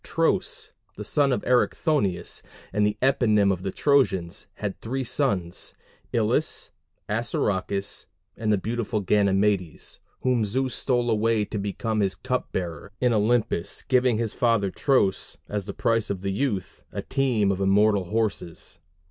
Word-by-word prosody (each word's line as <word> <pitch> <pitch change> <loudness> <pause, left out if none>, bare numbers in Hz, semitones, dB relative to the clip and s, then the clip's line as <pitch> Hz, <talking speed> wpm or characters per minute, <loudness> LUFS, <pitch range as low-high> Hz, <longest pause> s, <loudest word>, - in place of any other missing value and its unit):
Tros, - - 0 0.3
the 105 - -5
son 140 +6 +2
of 125 - 0
Erichthonius, 125 - +1 0.3
and 105 +1 +3
the 105 0 -2
eponym 110 -7 +4
of 90 - -5
the 95 - -2
Trojans, 100 - +1
had 100 -2 -5
three 130 +4 -2
sons 100 -10 -1 0.4
Ilus, - - 0 0.4
Assaracus, 100 -3 -1 0.3
and 110 -1 -1
the 105 - +4
beautiful 110 +1 -2
Ganymedes, 100 -3 +1 0.2
whom 125 -3 +2
Zeus 130 +4 -1
stole 120 -2 +1
away 110 0 +2
to 105 0 -4
become 110 +2 -2
his 95 -2 +1
cup 125 -1 -3
bearer 85 0 -4
in 125 -2 +3
Olympus, 110 -5 +1
giving 125 -3 +3
to - - -1
his 110 - -2
father 115 -5 +2
Tros, 115 -8 +1
as 105 -2 -3
the 100 - -4
price 115 -2 +1
of 95 -2 -3
the 100 0 -1
youth, 100 -6 -2
a - - -4
team 120 -7 +1
of 95 0 -2
immortal 100 0 +3
horses. 100 -5 -3
105 Hz, 150 wpm, -25 LUFS, 100-120 Hz, 0.4 s, eponym